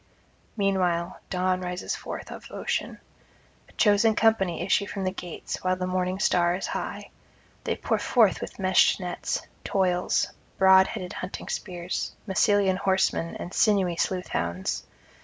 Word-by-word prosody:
Meanwhile 185 Hz, -3 st, 0 dB
Dawn 185 Hz, 0 st, 0 dB
rises 180 Hz, 0 st, -3 dB
forth -, -, -7 dB
of -, -, -9 dB
ocean. -, -, -3 dB, 0.7 s
A -, -, -20 dB
chosen 210 Hz, +1 st, +4 dB
company 195 Hz, -7 st, +2 dB
issue 200 Hz, +2 st, +2 dB
from 195 Hz, -, -4 dB
the 185 Hz, -, 0 dB
gates 180 Hz, -2 st, -6 dB
while 185 Hz, 0 st, +1 dB
the 185 Hz, 0 st, -3 dB
morning 185 Hz, 0 st, -1 dB
star 175 Hz, -2 st, +2 dB
is 190 Hz, -, -4 dB
high; -, -, -5 dB, 0.5 s
they -, -, 0 dB
pour -, -, -1 dB
forth 220 Hz, -7 st, +3 dB
with -, -, -7 dB
meshed 190 Hz, 0 st, +4 dB
nets, 180 Hz, -1 st, -3 dB, 0.2 s
toils, 180 Hz, -2 st, +1 dB, 0.3 s
broad 190 Hz, 0 st, +7 dB
headed 180 Hz, -1 st, -5 dB
hunting 185 Hz, -, -6 dB
spears, 180 Hz, -2 st, -4 dB
Massylian 195 Hz, -1 st, +3 dB
horsemen 190 Hz, -3 st, +1 dB
and 175 Hz, -, -7 dB
sinewy 195 Hz, -5 st, +3 dB
sleuth 180 Hz, +1 st, -1 dB
hounds. 85 Hz, +2 st, -2 dB
185 Hz, 140 wpm, -26 LUFS, 180-195 Hz, 0.7 s, broad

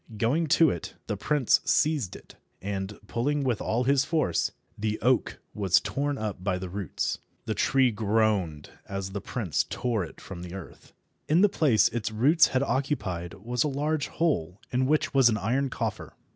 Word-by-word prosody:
Going 140 Hz, +10 st, +1 dB
to 165 Hz, -3 st, +6 dB
it, 85 Hz, -, -6 dB
the -, -, -2 dB
prince 145 Hz, -5 st, +2 dB
seized 150 Hz, -, +1 dB
it, -, -, -13 dB, 0.3 s
and, 100 Hz, +1 st, -4 dB
pulling 140 Hz, +7 st, -1 dB
with 125 Hz, -5 st, 0 dB
all 115 Hz, +3 st, 0 dB
his 135 Hz, +1 st, +3 dB
force, 155 Hz, -, 0 dB, 0.2 s
the 105 Hz, 0 st, -2 dB
oak 125 Hz, +1 st, +1 dB, 0.2 s
was 100 Hz, -2 st, +3 dB
torn 145 Hz, +5 st, -2 dB
up 105 Hz, -5 st, -4 dB
by 90 Hz, -2 st, 0 dB
the 90 Hz, 0 st, -6 dB
roots. 95 Hz, -4 st, -2 dB, 0.3 s
The -, -, -1 dB
tree 130 Hz, -2 st, +3 dB
groaned 105 Hz, -7 st, 0 dB, 0.2 s
as 95 Hz, -1 st, -4 dB
the 100 Hz, 0 st, -4 dB
prince 100 Hz, -, -1 dB
tore 120 Hz, -5 st, -1 dB
it 85 Hz, -, -10 dB
from 90 Hz, -3 st, -9 dB
the 90 Hz, +1 st, -7 dB
earth. 95 Hz, -4 st, -11 dB, 0.4 s
In 160 Hz, +4 st, +5 dB
the 205 Hz, -, +6 dB
place 140 Hz, -, +4 dB
its 115 Hz, -2 st, -2 dB
roots 135 Hz, +10 st, +4 dB
had 130 Hz, +1 st, 0 dB
occupied 100 Hz, -, -2 dB
was 120 Hz, +5 st, -1 dB
a -, -, 0 dB
large 150 Hz, +1 st, -1 dB
hole 95 Hz, -, -1 dB
in 130 Hz, +1 st, +1 dB
which 155 Hz, 0 st, +1 dB
was 135 Hz, -3 st, +6 dB
an 110 Hz, -, +1 dB
iron 130 Hz, +8 st, 0 dB
coffer. -, -, -4 dB
115 Hz, 180 wpm, -27 LUFS, 95-140 Hz, 0.4 s, to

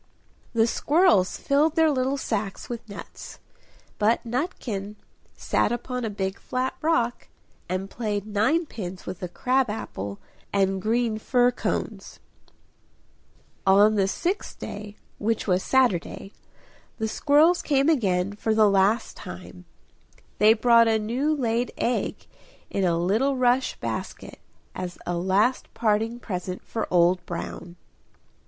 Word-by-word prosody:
The 225 Hz, -1 st, +4 dB
squirrels 235 Hz, -, +3 dB
filled 295 Hz, +3 st, +2 dB
their 320 Hz, -2 st, +4 dB
little 265 Hz, 0 st, 0 dB
sacks 210 Hz, -6 st, -3 dB
with 235 Hz, -2 st, -6 dB
nuts. 200 Hz, -, -9 dB, 0.6 s
But 220 Hz, +3 st, +2 dB
Nutkin 230 Hz, -, -3 dB, 0.4 s
sat -, -, 0 dB
upon 250 Hz, +1 st, -3 dB
a 225 Hz, -, -1 dB
big 195 Hz, -1 st, -3 dB
flat 255 Hz, +1 st, -2 dB
rock, 245 Hz, -7 st, 0 dB, 0.4 s
and 185 Hz, +2 st, -2 dB
played 210 Hz, -2 st, -3 dB
ninepins 215 Hz, -, -1 dB
with 180 Hz, -1 st, -6 dB
a 180 Hz, -, -3 dB
crab 255 Hz, +7 st, +1 dB
apple 100 Hz, -, -5 dB, 0.3 s
and 195 Hz, -1 st, +1 dB
green 225 Hz, 0 st, 0 dB
fir 245 Hz, +2 st, +3 dB
cones. -, -, -4 dB, 1.5 s
On 205 Hz, +3 st, +6 dB
the 195 Hz, -2 st, +2 dB
sixth 360 Hz, -, -2 dB
day, 205 Hz, 0 st, -7 dB, 0.2 s
which 225 Hz, +1 st, -1 dB
was 185 Hz, -2 st, +2 dB
Saturday, 205 Hz, -6 st, 0 dB, 0.6 s
the 220 Hz, -, -1 dB
squirrels 305 Hz, +9 st, +3 dB
came 280 Hz, -1 st, +2 dB
again 200 Hz, -, +1 dB
for 220 Hz, +1 st, -1 dB
the 215 Hz, -1 st, +5 dB
last 200 Hz, +4 st, +2 dB
time; -, -, -10 dB, 0.7 s
they 215 Hz, +1 st, +6 dB
brought 230 Hz, 0 st, +5 dB
a 220 Hz, -1 st, +3 dB
new 240 Hz, +8 st, -1 dB
laid 245 Hz, -4 st, 0 dB
egg 245 Hz, -, -1 dB, 0.5 s
in 195 Hz, -, 0 dB
a 170 Hz, -2 st, +2 dB
little 220 Hz, +11 st, +1 dB
rush 255 Hz, +1 st, +2 dB
basket -, -, -5 dB, 0.3 s
as 180 Hz, -1 st, -6 dB
a 175 Hz, -, -2 dB
last 195 Hz, +8 st, +1 dB
parting 225 Hz, +1 st, 0 dB
present 185 Hz, -4 st, -5 dB
for 225 Hz, -, -3 dB
Old 175 Hz, +1 st, +3 dB
Brown. 170 Hz, 0 st, -6 dB
220 Hz, 130 wpm, -25 LUFS, 195-250 Hz, 1.5 s, On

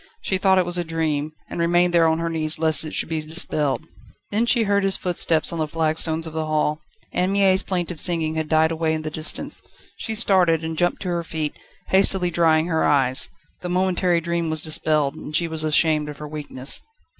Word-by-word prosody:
She 190 Hz, -, -1 dB
thought 190 Hz, -1 st, +3 dB
it 185 Hz, -, +3 dB
was 175 Hz, 0 st, 0 dB
a -, -, -1 dB
dream, 155 Hz, -2 st, -2 dB, 0.2 s
and -, -, -7 dB
remained 175 Hz, +1 st, +2 dB
there 165 Hz, -1 st, +4 dB
on 160 Hz, 0 st, +1 dB
her 165 Hz, 0 st, -2 dB
knees 160 Hz, -1 st, +2 dB
lest 155 Hz, -2 st, +3 dB
it 155 Hz, -, -6 dB
should -, -, +1 dB
be 160 Hz, -1 st, -2 dB
dispelled. 155 Hz, -2 st, -2 dB, 0.5 s
Then 220 Hz, +3 st, +1 dB
she 235 Hz, -1 st, +3 dB
heard 200 Hz, -1 st, +1 dB
his 195 Hz, 0 st, +3 dB
footsteps 170 Hz, -3 st, +1 dB
on 165 Hz, -, -4 dB
the 155 Hz, -, -1 dB
flagstones 160 Hz, +1 st, 0 dB
of 160 Hz, -, -6 dB
the 160 Hz, -1 st, -3 dB
hall. 150 Hz, 0 st, 0 dB, 0.3 s
Anne 180 Hz, +2 st, 0 dB
Mie's 195 Hz, -1 st, +3 dB
plaintive 180 Hz, -4 st, -3 dB
singing 165 Hz, -3 st, 0 dB
had 160 Hz, -1 st, -3 dB
died 160 Hz, 0 st, +3 dB
away 160 Hz, -1 st, -1 dB
in 155 Hz, -, -5 dB
the 155 Hz, -, -5 dB
distance. 155 Hz, +1 st, 0 dB, 0.4 s
She 220 Hz, -, -4 dB
started, 180 Hz, -7 st, +2 dB
and 160 Hz, 0 st, -4 dB
jumped 175 Hz, +4 st, 0 dB
to 185 Hz, -, -3 dB
her 170 Hz, -1 st, -1 dB
feet, 160 Hz, -2 st, -4 dB, 0.4 s
hastily 190 Hz, -2 st, +4 dB
drying 160 Hz, -1 st, +3 dB
her 160 Hz, -2 st, 0 dB
eyes. 130 Hz, -2 st, +2 dB, 0.3 s
The 180 Hz, -, -5 dB
momentary 180 Hz, -1 st, +1 dB
dream 170 Hz, -1 st, -2 dB
was 155 Hz, -1 st, -3 dB
dispelled, 155 Hz, -2 st, +1 dB
and 155 Hz, -1 st, -6 dB
she 170 Hz, -, +3 dB
was 160 Hz, -1 st, -4 dB
ashamed 155 Hz, -1 st, +2 dB
of 145 Hz, -, -8 dB
her 150 Hz, -, -8 dB
weakness. 145 Hz, -3 st, -3 dB
160 Hz, 215 wpm, -22 LUFS, 155-175 Hz, 0.5 s, there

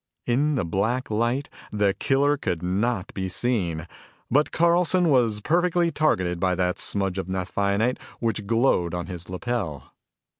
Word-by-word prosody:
In 140 Hz, +5 st, +1 dB
the 120 Hz, -, 0 dB
black 110 Hz, +9 st, -1 dB
light, 120 Hz, +6 st, 0 dB, 0.2 s
the 105 Hz, -2 st, +2 dB
killer 140 Hz, +5 st, +2 dB
could 90 Hz, -, -3 dB
not 100 Hz, +3 st, -1 dB
be 95 Hz, -1 st, -3 dB
seen, 90 Hz, -7 st, -1 dB, 0.5 s
but 145 Hz, +4 st, +3 dB
Carlson 170 Hz, +1 st, +3 dB
was 115 Hz, -6 st, +2 dB
perfectly 175 Hz, +3 st, +2 dB
targeted 90 Hz, -, +1 dB
by 90 Hz, 0 st, +1 dB
that 90 Hz, +1 st, 0 dB
smudge 95 Hz, -2 st, -1 dB
of 95 Hz, -, -4 dB
naphthionate 100 Hz, +5 st, 0 dB, 0.2 s
which 110 Hz, -3 st, -2 dB
glowed 115 Hz, -7 st, +2 dB
on 90 Hz, -1 st, -3 dB
his 90 Hz, -1 st, -8 dB
lapel. 90 Hz, -, -4 dB
105 Hz, 145 wpm, -25 LUFS, 90-135 Hz, 0.5 s, but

